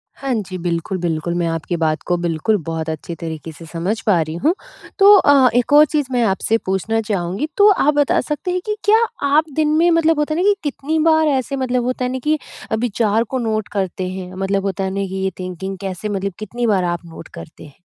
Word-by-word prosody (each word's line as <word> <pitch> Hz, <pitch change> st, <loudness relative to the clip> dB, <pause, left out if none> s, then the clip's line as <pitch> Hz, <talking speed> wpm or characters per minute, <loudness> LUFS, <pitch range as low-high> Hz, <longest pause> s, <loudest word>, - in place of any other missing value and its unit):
हाँ 270 Hz, -2 st, -3 dB
जी, 190 Hz, -4 st, -3 dB
बिल्कुल-बिल्कुल 170 Hz, -1 st, -2 dB
मैं 170 Hz, -1 st, 0 dB
आपकी 165 Hz, +1 st, -2 dB
बात 155 Hz, -1 st, 0 dB
को 175 Hz, -, +2 dB
बिल्कुल 170 Hz, +5 st, 0 dB
बहुत 160 Hz, -1 st, -3 dB
अच्छे 160 Hz, +2 st, -5 dB
तरीके 160 Hz, -1 st, -6 dB
से 165 Hz, +2 st, -12 dB
समझ 175 Hz, +7 st, -3 dB
पा 185 Hz, -6 st, +3 dB
रही 155 Hz, +1 st, -4 dB
हूँ। 325 Hz, +4 st, +4 dB, 0.5 s
तो 400 Hz, +1 st, +8 dB
अ, 275 Hz, -7 st, +5 dB
एक 245 Hz, +4 st, +2 dB
और 300 Hz, +1 st, +8 dB
चीज़ 295 Hz, -2 st, -1 dB
मैं 245 Hz, -2 st, +2 dB
आपसे 220 Hz, +2 st, +1 dB
पूछना 205 Hz, +4 st, 0 dB
चाहूँगी। 200 Hz, -, -2 dB
तो, 410 Hz, +1 st, +7 dB
आप 300 Hz, -6 st, +2 dB
बता 290 Hz, -1 st, +2 dB
सकते 300 Hz, +4 st, -3 dB
हैं 365 Hz, 0 st, -1 dB
कि 425 Hz, -, -1 dB
क्या 440 Hz, +2 st, +5 dB, 0.2 s
आप 305 Hz, +2 st, +3 dB
दिन 310 Hz, -1 st, +2 dB
में 345 Hz, +2 st, +4 dB
मतलब 325 Hz, -2 st, +3 dB
होता 300 Hz, +1 st, 0 dB
है 330 Hz, -, -1 dB
ना -, -, +1 dB
कि 405 Hz, -, +3 dB
कितनी 295 Hz, +2 st, -2 dB
बार 315 Hz, 0 st, +4 dB
ऐसे 275 Hz, -1 st, 0 dB
मतलब 255 Hz, -2 st, -1 dB
होता 255 Hz, 0 st, -1 dB
है 250 Hz, -, -2 dB
ना 260 Hz, -, -3 dB
कि 305 Hz, +1 st, +2 dB, 0.3 s
अ, -, -, +2 dB
विचार 225 Hz, -1 st, +1 dB
को 260 Hz, +3 st, -4 dB
नोट 220 Hz, -2 st, -1 dB
करते 185 Hz, -2 st, -2 dB
हैं 185 Hz, -1 st, -7 dB
मतलब 195 Hz, +1 st, -1 dB
होता 195 Hz, 0 st, -2 dB
है 190 Hz, -, -1 dB
ना 195 Hz, -, -1 dB
कि 190 Hz, -, -6 dB
ये 190 Hz, -, 0 dB
थिंकिंग 185 Hz, +1 st, -5 dB
कैसे 195 Hz, +2 st, -4 dB
मतलब 200 Hz, -1 st, -2 dB
कितनी 235 Hz, +3 st, -3 dB
बार 195 Hz, -4 st, +2 dB
आप 175 Hz, 0 st, -2 dB
नोट 165 Hz, -1 st, -11 dB
करते 85 Hz, 0 st, -11 dB
हैं 145 Hz, -, -15 dB
215 Hz, 230 wpm, -19 LUFS, 175-285 Hz, 0.5 s, तो